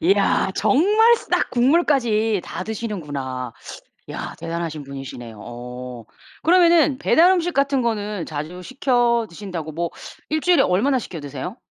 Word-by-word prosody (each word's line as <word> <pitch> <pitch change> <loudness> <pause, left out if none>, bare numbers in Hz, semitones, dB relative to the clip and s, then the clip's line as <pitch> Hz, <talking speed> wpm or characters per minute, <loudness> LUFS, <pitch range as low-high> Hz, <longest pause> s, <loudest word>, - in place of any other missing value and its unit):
이야. 195 +1 +2
정말 430 - +4
싹 - - -1
국물까지 240 - +2
다 170 - -5
드시는구나. 145 - -5 0.6
야. - - -6
대단하신 165 -2 -4
분이시네요. 135 -5 -8
어. 125 0 -8 0.4
그러면은 335 -5 +4
배달 345 +5 +5
음식 355 -2 +1
같은 275 -1 +2
거는 210 -5 -2
자주 160 +4 -6
시켜 240 -2 +1
드신다고 170 -4 -6
뭐 170 +2 -2 0.4
일주일에 325 +3 +3
얼마나 255 +9 +2
시켜 175 -8 -7
드세요? 145 - -7
205 Hz, 300 characters per minute, -22 LUFS, -, 0.6 s, 배달